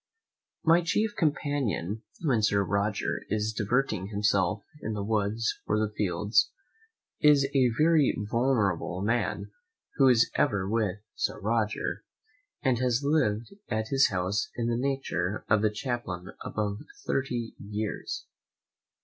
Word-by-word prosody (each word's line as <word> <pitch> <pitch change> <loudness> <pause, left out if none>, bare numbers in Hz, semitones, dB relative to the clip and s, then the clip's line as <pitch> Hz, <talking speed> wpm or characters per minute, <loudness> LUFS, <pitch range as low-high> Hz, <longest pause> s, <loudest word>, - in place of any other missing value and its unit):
My 165 +2 +5
chief 210 +5 0
companion, 140 - -1 0.2
when 130 -8 +2
Sir 100 -1 +3
Roger 100 +2 -1
is 110 +1 0
diverting 110 -2 0
himself 100 -1 +1 0.2
in 110 - -3
the 105 -1 -3
woods 110 +1 0
or 105 - +2
the 105 -1 0
fields, 100 +1 +2 0.7
is 150 -2 +6
a 130 -3 +4
very 155 -2 +4
venerable 105 -5 0
man 105 -2 -1 0.5
who 135 - +6
is 120 -2 +5
ever 100 -9 +1
with 105 -2 0
Sir - - -2
Roger, 110 +1 -1 0.6
and 130 -4 +2
has 125 +1 +1
lived 130 - +1 0.2
at 110 -1 -1
his 135 0 +4
house 95 +4 -1
in 120 -1 -1
the 120 - +1
nature 120 -7 -1
of 110 -1 +3
a 110 - +4
chaplain 105 -6 -4
above 105 -1 -2 0.3
thirty 120 -4 -1
years. 105 +1 -4
110 Hz, 130 wpm, -28 LUFS, 100-130 Hz, 0.7 s, is